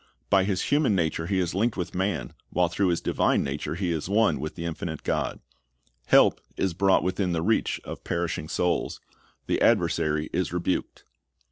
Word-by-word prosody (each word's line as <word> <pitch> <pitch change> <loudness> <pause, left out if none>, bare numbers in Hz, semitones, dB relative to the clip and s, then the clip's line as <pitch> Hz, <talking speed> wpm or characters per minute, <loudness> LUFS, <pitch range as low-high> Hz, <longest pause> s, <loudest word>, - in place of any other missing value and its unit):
By 95 -2 +5
His 95 -2 0
human 145 -8 +3
nature 80 -2 0
He 95 0 0
is 90 -2 0
linked 110 +5 0
with 90 - -3
man, 95 -1 -2 0.2
while 90 -1 +1
through 95 +2 +1
His 85 -1 +1
divine - - +1
nature 70 +3 -3
He 90 -1 -1
is 80 +1 -3
one 105 -6 +3
with 75 +2 -5
the 85 - -5
infinite 80 -1 -4
God. - - -1 0.7
Help - - +5 0.2
is 95 -3 0
brought 95 +2 +3
within 95 -1 0
the 80 -1 -1
reach 110 +4 +1
of - - -8
perishing 85 -3 -2
souls. 90 -1 0 0.5
The - - 0
adversary 75 0 +2
is 90 -1 0
rebuked. 90 +1 -2
90 Hz, 175 wpm, -26 LUFS, 85-95 Hz, 0.7 s, By